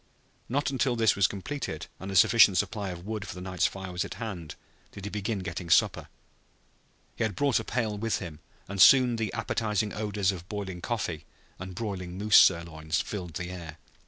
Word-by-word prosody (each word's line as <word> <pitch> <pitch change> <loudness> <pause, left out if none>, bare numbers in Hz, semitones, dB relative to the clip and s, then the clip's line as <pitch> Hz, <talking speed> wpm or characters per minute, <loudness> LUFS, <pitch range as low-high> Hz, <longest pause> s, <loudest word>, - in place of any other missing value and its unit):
Not 140 +3 0
until 130 -2 +1
this 115 -3 +3
was 100 -2 +4
completed 100 - -5
and 95 - -7
a - - -4
sufficient 100 0 +6
supply 100 +1 -1
of 90 0 -8
wood 105 -1 -4
for - - -7
the - - -7
night's 90 0 0
fire 95 -1 -7
was 90 0 -1
at - - -7
hand 95 -9 -6 0.4
did 100 - -9
he 105 - -5
begin 105 +1 -2
getting 85 0 -5
supper. - - +3 1.1
He - - -1
had 110 -4 -1
brought 140 -5 +2
a - - -4
pail 110 -3 -2
with 115 +1 0
him 80 -5 -8 0.3
and 100 -1 -1
soon 125 -1 +7
the 110 -2 -2
appetizing 110 -2 -1
odors 105 -2 0
of 90 0 -9
boiling 95 -4 -5
coffee 95 -9 -3 0.3
and 95 0 -7
broiling 95 -5 -5
moose 105 +2 +5
sirloin 85 -3 +3
filled 85 +1 -2
the 90 0 -4
air. 85 -4 -8
100 Hz, 190 wpm, -28 LUFS, 90-110 Hz, 1.1 s, soon